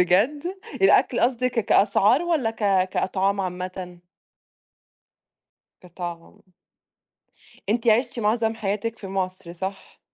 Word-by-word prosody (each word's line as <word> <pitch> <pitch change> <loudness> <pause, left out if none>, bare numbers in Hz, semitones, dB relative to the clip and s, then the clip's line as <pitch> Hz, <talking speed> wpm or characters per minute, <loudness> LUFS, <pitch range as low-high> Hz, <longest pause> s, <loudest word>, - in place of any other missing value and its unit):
بجد؟ 205 - +2 0.4
الأكل - - +4
قصدِك 255 +1 +1
ك 230 - +1
كأسعار 210 - +3
والّا 315 -10 0
ك 200 -4 +1
كأطعام 195 +1 0
عامةً؟ 180 -1 -5 1.8
كطعم. 175 +2 -8 1.3
أنتِ 230 +2 0
عِشتِ 235 +2 +2
معظم 225 +1 +1
حياتِك 215 +2 -3
في 195 - -8
مصر، 185 -2 -4
صح؟ 190 +2 -7
200 Hz, 100 wpm, -24 LUFS, 185-230 Hz, 1.8 s, الأكل